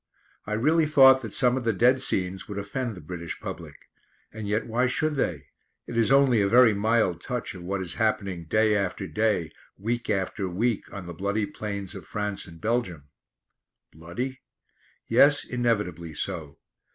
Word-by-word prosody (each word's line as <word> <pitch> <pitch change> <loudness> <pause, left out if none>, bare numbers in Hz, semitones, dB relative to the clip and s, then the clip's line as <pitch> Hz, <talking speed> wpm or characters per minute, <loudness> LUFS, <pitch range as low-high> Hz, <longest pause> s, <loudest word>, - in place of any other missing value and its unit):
I 105 - -2
really 155 +8 +3
thought 135 -3 +7
that 115 -4 -7
some 125 +2 +2
of 130 - -3
the 115 -1 +1
dead 125 +6 +3
scenes 95 -7 -2
would 105 - -6
offend 115 +3 -3
the 90 - -10
British 85 +1 -6
public. - - -7 0.6
And 110 -1 -6
yet 105 +2 0
why 120 +3 +1
should 155 +4 +1
they? 80 - -2 0.4
It 120 - -7
is 115 +2 +3
only 135 -5 +5
a 100 - +2
very 120 +1 +6
mild 105 -4 +1
touch 125 -2 -4
of 90 - -10
what 95 +2 -3
is 85 -2 -5
happening 100 -6 -1
day 110 +5 +2
after 100 0 -1
day, 90 -2 0 0.3
week 115 +4 -3
after 95 -1 -1
week, 110 +5 -1
on 100 -2 -7
the 85 - -7
bloody 100 +5 -1
plains 100 -2 -6
of - - -10
France 105 -1 -3
and 80 -1 -13
Belgium. 90 -9 -2 0.8
Bloody? 95 +12 -5 0.7
Yes, 145 +5 +5
inevitably 105 -10 -1
so. 80 -4 -4
105 Hz, 170 wpm, -26 LUFS, 90-120 Hz, 0.8 s, thought